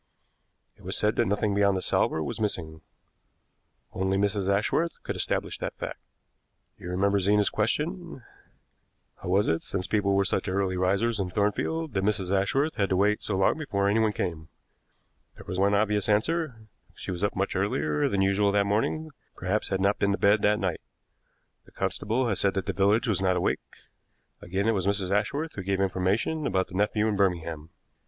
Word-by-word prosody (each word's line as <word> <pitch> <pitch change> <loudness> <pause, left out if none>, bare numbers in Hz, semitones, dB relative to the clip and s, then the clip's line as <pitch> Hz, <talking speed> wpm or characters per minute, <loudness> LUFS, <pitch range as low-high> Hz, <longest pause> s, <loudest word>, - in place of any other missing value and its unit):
It - - -21
was - - 0
said 105 0 +1
that 120 - +2
nothing 105 +1 0
beyond 100 -1 +3
the - - -2
salver 80 - +1
was 75 - -5
missing. 80 -7 -3 1.1
Only 95 0 0
Mrs. 100 -1 0
Ashworth 125 +11 +1
could - - -4
establish - - -2
that - - -5
fact. - - -6 0.8
You 90 - -7
remember 100 +2 +1
Zena's 105 +2 +2
question: 155 - -2 0.9
'How - - -7
was 100 +3 +3
it, 80 0 +1
since 95 -1 -3
people 100 -1 +1
were 100 0 +3
such 95 - -1
early 95 0 0
risers 100 +5 +1
in 95 -2 -1
Thornfield, 120 - -1
that 95 -2 0
Mrs. 100 -2 0
Ashworth 135 +11 0
had 100 -2 +1
to 95 - +1
wait 105 +3 +2
so 100 - -2
long 95 +10 +2
before 100 -10 -1
anyone 110 +1 +3
came?' 85 -6 -4 0.9
There - - -13
was 95 - -4
one 100 +1 +3
obvious 105 0 +1
answer. 120 +2 0 0.3
She - - -6
was 90 +1 -4
up 100 - 0
much 100 +1 -1
earlier 75 -6 0
than 95 -1 +1
usual 100 +1 +2
that 100 -1 +3
morning, 135 +10 -1 0.2
perhaps 95 +4 -1
had 95 - 0
not 100 +2 +1
been 100 0 +2
to - - -1
bed 100 +1 +3
that 105 0 +3
night. 95 -5 -2 0.8
The - - -19
constable 120 +5 -1
had 100 -4 0
said 100 0 +1
that 95 - -1
the 100 - -2
village 105 +6 +2
was 105 -4 +1
not 95 -1 +2
awake. 90 - 0 0.8
Again, 95 +4 -2
it - - +4
was 95 -2 -1
Mrs. 100 -2 0
Ashworth 140 +11 -1
who 100 - -5
gave 95 0 -1
information 100 - 0
about 95 -4 0
the - - -13
nephew 105 +2 +1
in 105 - 0
Birmingham. 85 -5 -1
100 Hz, 190 wpm, -27 LUFS, 95-105 Hz, 1.1 s, it